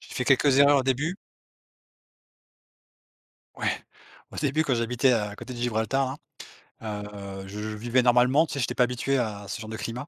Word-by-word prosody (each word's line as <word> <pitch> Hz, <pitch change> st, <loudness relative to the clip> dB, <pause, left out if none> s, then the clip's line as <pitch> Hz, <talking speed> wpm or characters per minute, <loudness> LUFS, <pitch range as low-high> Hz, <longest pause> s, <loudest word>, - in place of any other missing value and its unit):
J'ai -, -, -13 dB
fait 130 Hz, -, -1 dB
quelques 135 Hz, 0 st, +4 dB
erreurs 140 Hz, 0 st, +6 dB
au -, -, +1 dB
début. 145 Hz, +8 st, -1 dB, 2.4 s
Oui, -, -, -2 dB, 0.6 s
au -, -, -10 dB
début, 155 Hz, +2 st, +1 dB
j'habitais 125 Hz, +1 st, +2 dB
à 105 Hz, -2 st, -1 dB
côté 125 Hz, -, -8 dB
de -, -, -8 dB
Gibraltar 125 Hz, +4 st, 0 dB, 0.6 s
là, 105 Hz, -2 st, -5 dB, 0.4 s
heu, -, -, -10 dB
je 105 Hz, +2 st, -7 dB
vivais 110 Hz, +4 st, 0 dB
normalement, 125 Hz, +5 st, +4 dB
tu -, -, -7 dB
sais, 140 Hz, -, -3 dB
j'étais 120 Hz, -, -1 dB
pas 125 Hz, -, +4 dB
habitué 125 Hz, +3 st, 0 dB
à 105 Hz, -4 st, -2 dB
à 100 Hz, -, -11 dB
ce 100 Hz, -, -5 dB
genre 110 Hz, -, -8 dB
de 110 Hz, -, -5 dB
climat 120 Hz, +5 st, -5 dB
125 Hz, 180 wpm, -26 LUFS, 110-135 Hz, 2.4 s, erreurs